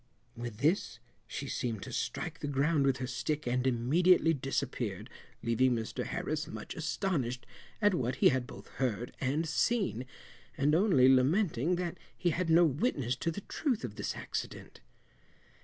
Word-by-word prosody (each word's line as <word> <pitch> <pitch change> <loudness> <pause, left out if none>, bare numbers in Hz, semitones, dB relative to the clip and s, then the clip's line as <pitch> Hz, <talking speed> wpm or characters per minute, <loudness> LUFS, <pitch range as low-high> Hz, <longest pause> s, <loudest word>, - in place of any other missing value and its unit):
With 120 -2 -6
this 150 - +1 0.3
she 140 - -5
seemed 115 -6 -3
to - - -7
strike - - -3
the - - -4
ground 145 +1 +2
with 135 -1 +2
her 130 - -3
stick 150 +4 -2
and 125 +1 +1
immediately 165 +8 +4
disappeared, 125 - -3 0.3
leaving 120 +2 +3
Mr 110 -2 -3
Harris - - -2
much - - -7
astonished 155 - -2 0.4
at 205 -1 +5
what 125 -7 0
he - - +5
had 130 -2 -1
both - - -11
heard 120 -2 -1
and 145 +5 0
seen, 160 - 0 0.5
and 145 +1 +2
only 170 -8 +5
lamenting 150 - +3
that 175 -1 -3 0.2
he 175 - +1
had 170 +1 -1
no 170 +2 +6
witness 140 - 0
to 170 - -1
the 185 +5 -4
truth 255 - -2
of 120 -5 -4
this - - -4
accident. - - -6
135 Hz, 155 wpm, -31 LUFS, 125-170 Hz, 0.5 s, no